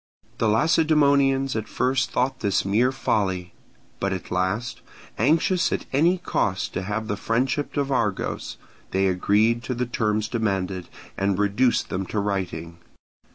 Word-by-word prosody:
The 115 Hz, -, +2 dB
Lacedaemonians 140 Hz, 0 st, +3 dB
at 110 Hz, -1 st, -3 dB
first 125 Hz, 0 st, 0 dB
thought 125 Hz, +2 st, 0 dB
this 100 Hz, -3 st, 0 dB
mere 115 Hz, +6 st, +2 dB
folly; 95 Hz, -8 st, -1 dB, 0.5 s
but 100 Hz, -, -1 dB
at 95 Hz, -1 st, -5 dB
last, 95 Hz, +7 st, -1 dB, 0.4 s
anxious 165 Hz, -, +2 dB
at -, -, -2 dB
any 165 Hz, +7 st, +3 dB
cost 100 Hz, -, -1 dB
to -, -, -2 dB
have 105 Hz, +3 st, -3 dB
the 105 Hz, -, -1 dB
friendship 125 Hz, +8 st, -1 dB
of 140 Hz, -1 st, 0 dB
Argos 105 Hz, -7 st, -1 dB, 0.3 s
they 95 Hz, +1 st, +1 dB
agreed 105 Hz, +5 st, +2 dB
to 125 Hz, -, -2 dB
the 125 Hz, +1 st, -1 dB
terms 110 Hz, -3 st, 0 dB
demanded, 95 Hz, -5 st, -2 dB, 0.3 s
and 100 Hz, -1 st, +1 dB
reduced 105 Hz, +5 st, +2 dB
them 95 Hz, 0 st, -3 dB
to 105 Hz, -, -2 dB
writing. 90 Hz, -5 st, -3 dB
110 Hz, 145 wpm, -24 LUFS, 95-130 Hz, 0.5 s, Lacedaemonians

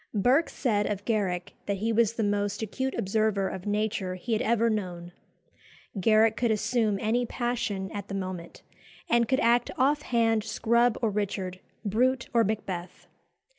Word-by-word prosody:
Burke 255 Hz, -, +3 dB
said 210 Hz, -5 st, 0 dB
of 200 Hz, -1 st, -3 dB
Garrick 190 Hz, -6 st, -1 dB
that 200 Hz, -1 st, 0 dB
he 225 Hz, +3 st, -1 dB
was 225 Hz, -1 st, +3 dB
the 230 Hz, -, -1 dB
most 205 Hz, +1 st, -1 dB
acute 260 Hz, +5 st, -3 dB
observer 200 Hz, 0 st, +1 dB
of 190 Hz, +1 st, -6 dB
nature 205 Hz, -3 st, -1 dB
he 225 Hz, +6 st, -3 dB
had 220 Hz, -, +1 dB
ever 230 Hz, 0 st, +2 dB
known. 180 Hz, -5 st, -3 dB, 0.9 s
Garrick 220 Hz, +2 st, +4 dB
could 240 Hz, -, 0 dB
assume 220 Hz, -1 st, +1 dB
any 230 Hz, +4 st, +1 dB
passion 235 Hz, -6 st, -2 dB
at 200 Hz, -1 st, -6 dB
the 195 Hz, -, -5 dB
moment, 185 Hz, -3 st, -6 dB, 0.4 s
and 235 Hz, -1 st, +3 dB
could 260 Hz, +3 st, +2 dB
act 235 Hz, +1 st, +3 dB
off 285 Hz, +3 st, +3 dB
hand 225 Hz, -4 st, +1 dB
Scrub 235 Hz, +2 st, +2 dB
or 220 Hz, -, +2 dB
Richard, 190 Hz, -3 st, -3 dB, 0.3 s
Brute 245 Hz, +5 st, +1 dB
or 230 Hz, -1 st, +5 dB
Macbeth. 190 Hz, -4 st, -4 dB
215 Hz, 160 wpm, -27 LUFS, 195-235 Hz, 0.9 s, or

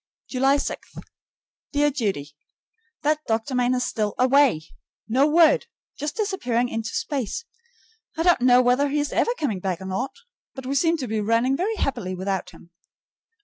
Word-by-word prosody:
July 270 Hz, +2 st, +2 dB
6. 280 Hz, -, -5 dB, 0.8 s
Dear 295 Hz, 0 st, +3 dB
Judy: 195 Hz, -, -3 dB, 0.7 s
That 305 Hz, +1 st, +2 dB
doctor 225 Hz, +4 st, -1 dB
man 250 Hz, 0 st, +2 dB
is 250 Hz, -1 st, 0 dB
still 210 Hz, -2 st, -2 dB
away. 255 Hz, -, +4 dB, 0.4 s
No 260 Hz, +6 st, +3 dB
word; 325 Hz, +7 st, +4 dB, 0.3 s
just 295 Hz, +1 st, -4 dB
disappeared 250 Hz, -, 0 dB
into 225 Hz, 0 st, -4 dB
space. 280 Hz, -, -3 dB, 0.7 s
I 325 Hz, -, +1 dB
don't 350 Hz, -6 st, +4 dB
know 250 Hz, 0 st, +6 dB
whether 250 Hz, +4 st, +3 dB
he 295 Hz, +2 st, 0 dB
is 290 Hz, 0 st, -2 dB
ever -, -, +2 dB
coming 225 Hz, -11 st, -1 dB
back 185 Hz, -2 st, -2 dB
or 190 Hz, -, -8 dB
not, 215 Hz, +8 st, -3 dB, 0.4 s
but 265 Hz, -2 st, -8 dB
we 265 Hz, -, -2 dB
seem 330 Hz, +4 st, +2 dB
to 265 Hz, -5 st, -4 dB
be 220 Hz, -1 st, -1 dB
running 230 Hz, +5 st, +2 dB
very 400 Hz, +9 st, -1 dB
happily 185 Hz, -, -2 dB
without 190 Hz, +1 st, -3 dB
him. 170 Hz, -, -17 dB
255 Hz, 165 wpm, -24 LUFS, 220-290 Hz, 0.8 s, know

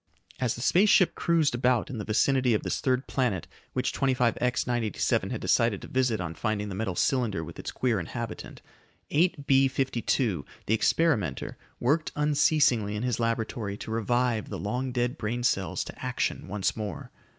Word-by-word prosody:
As 125 Hz, -3 st, 0 dB
the 120 Hz, -, -7 dB
space 185 Hz, -, +4 dB
ship 185 Hz, -, +5 dB
cruised 165 Hz, -5 st, +2 dB
about 125 Hz, -1 st, +1 dB
in 120 Hz, -, -5 dB
the -, -, -3 dB
vicinity 125 Hz, +3 st, +2 dB
of -, -, -1 dB
this -, -, -2 dB
third 130 Hz, 0 st, +1 dB
planet 120 Hz, -, -1 dB, 0.3 s
which -, -, -1 dB
25X 125 Hz, -2 st, +1 dB
987 120 Hz, -4 st, 0 dB
had -, -, -3 dB
decided 115 Hz, -4 st, +2 dB
to -, -, -7 dB
visit 125 Hz, -4 st, +1 dB
on 85 Hz, -2 st, -4 dB
finding 105 Hz, +1 st, -2 dB
the -, -, -5 dB
metal 95 Hz, -2 st, -2 dB
cylinder 115 Hz, -, +1 dB
with -, -, -9 dB
its -, -, -5 dB
queer 120 Hz, -5 st, 0 dB
inhabitant, 115 Hz, +7 st, -6 dB, 0.5 s
8B 140 Hz, -4 st, +3 dB
52, 120 Hz, -, 0 dB, 0.2 s
the 110 Hz, -, +1 dB
experimenter, 110 Hz, -, +1 dB, 0.2 s
worked 150 Hz, +6 st, +1 dB
unceasingly 145 Hz, -7 st, +2 dB
in 105 Hz, -, -3 dB
his 125 Hz, -3 st, -1 dB
laboratory 115 Hz, -3 st, -2 dB
to 110 Hz, -, -7 dB
revive 115 Hz, 0 st, 0 dB
the -, -, -4 dB
long 125 Hz, +6 st, -2 dB
dead 125 Hz, +3 st, -1 dB
brain 120 Hz, +3 st, -2 dB
cells 95 Hz, -6 st, 0 dB
to -, -, -10 dB
action -, -, -2 dB
once 100 Hz, 0 st, -1 dB
more. 105 Hz, -8 st, -6 dB
120 Hz, 170 wpm, -27 LUFS, 105-130 Hz, 0.5 s, ship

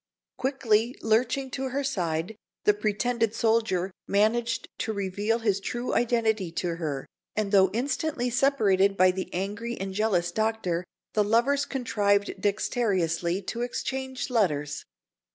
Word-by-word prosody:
Quickly 245 Hz, -3 st, +1 dB
lurching 255 Hz, +4 st, +1 dB
to 265 Hz, +1 st, -3 dB
her 280 Hz, +2 st, -1 dB
side, 175 Hz, -6 st, -2 dB, 0.3 s
the 210 Hz, -, +5 dB
pretended 220 Hz, +2 st, 0 dB
soldier 220 Hz, -5 st, +1 dB, 0.2 s
managed 230 Hz, +3 st, +1 dB
to 220 Hz, -, -1 dB
reveal 205 Hz, +3 st, -1 dB
his 210 Hz, -4 st, +1 dB
true 240 Hz, +5 st, -3 dB
identity 220 Hz, -6 st, +1 dB
to 170 Hz, -1 st, -2 dB
her; 150 Hz, -5 st, -3 dB, 0.3 s
and 210 Hz, -2 st, -1 dB
though 190 Hz, -2 st, +6 dB
instantly 250 Hz, +3 st, -1 dB
separated 200 Hz, -7 st, +3 dB
by 185 Hz, 0 st, +6 dB
the 185 Hz, +1 st, -5 dB
angry 210 Hz, +6 st, -3 dB
and 195 Hz, 0 st, -4 dB
jealous 190 Hz, -4 st, +1 dB
Doctor, 215 Hz, -4 st, 0 dB, 0.3 s
the 210 Hz, -, +3 dB
lovers 240 Hz, +7 st, +2 dB
contrived 205 Hz, -6 st, 0 dB
dexterously 190 Hz, -4 st, 0 dB
to 230 Hz, +5 st, -4 dB
exchange 260 Hz, +1 st, -3 dB
letters. 150 Hz, -11 st, 0 dB
215 Hz, 130 wpm, -27 LUFS, 190-240 Hz, 0.3 s, though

